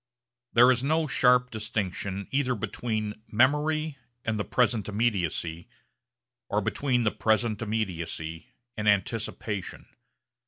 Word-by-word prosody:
There 125 +2 +7
is 125 0 0
no 155 +3 +2
sharp 125 -2 +3
distinction 100 -3 -3
either 135 -2 +1
between 110 -1 -3
memory 150 +5 +2 0.3
and 110 -1 -1
the - - +1
present 110 -3 +1
immediacy 90 -6 -1 0.8
or 105 - +2
between 125 +4 0
the 110 - +2
present 110 +1 +1
immediacy 85 -6 -3 0.3
and 105 -1 +1
anticipation. 105 -1 -1
110 Hz, 110 wpm, -27 LUFS, 100-125 Hz, 0.8 s, There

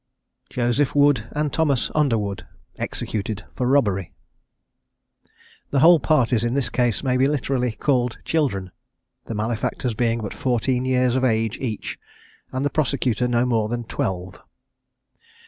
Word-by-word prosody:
JOSEPH 125 +4 0
WOOD 145 -6 +4
AND 150 -1 -1
THOMAS 145 -6 +1
UNDERWOOD, 115 -10 0 0.3
EXECUTED 105 0 -4
FOR 125 - -1
ROBBERY. 100 - +2 1.6
The 140 - +1
whole 170 +1 +7
parties 125 -7 +2
in 120 +2 0
this 135 -5 +1
case 120 0 0
may 130 -2 +1
be 130 +1 +4
literally 130 -4 0
called 125 0 0
children, 100 - 0 0.5
the 115 - -5
malefactors 115 +2 -2
being 115 +1 0
but 105 -3 -5
fourteen 125 0 0
years 130 -1 +2
of 130 - +1
age 110 -3 +1
each; 115 -5 -4 0.5
and 130 +2 -2
the 145 - 0
prosecutor 130 -5 0
no 120 0 +2
more 115 -3 +1
than 120 0 -2
twelve! 95 -4 -4
125 Hz, 135 wpm, -23 LUFS, 110-135 Hz, 1.6 s, whole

